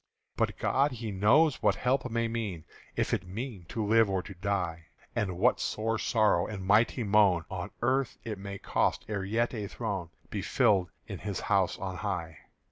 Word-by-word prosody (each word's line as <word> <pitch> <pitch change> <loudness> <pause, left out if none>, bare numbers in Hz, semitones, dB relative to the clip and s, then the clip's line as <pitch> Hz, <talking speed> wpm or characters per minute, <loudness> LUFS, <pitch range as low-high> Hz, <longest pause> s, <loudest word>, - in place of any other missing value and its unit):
But - - 0
God 140 +1 +2
He 115 -3 -5
knows 120 +11 +4
what - - +3
help 125 0 0
may 115 0 0
mean, 110 -8 -3 0.3
If - - 0
it 90 - -1
mean 105 -1 -6
to 110 +5 -3
live 110 0 +4
or 95 -2 0
to 100 - -9
die; 85 -3 -2 0.3
And 95 -6 -1
what 120 +7 +3
sore 110 +1 -1
sorrow 105 -6 +2
and 95 -3 -6
mighty 110 +5 +3
moan 100 -5 +4
On 90 -2 -4
earth 130 +1 +1
it 105 -3 -5
may 100 0 -6
cost - - 0
ere 100 -3 -2
yet 115 +6 0
a 105 -4 -3
throne 100 -6 -4 0.2
Be - - -2
filled 95 -4 +3 0.2
in 100 -4 -6
His 100 -2 -4
house 95 -3 +1
on 95 -1 -4
high. 90 -7 -3
105 Hz, 185 wpm, -30 LUFS, 95-115 Hz, 0.3 s, knows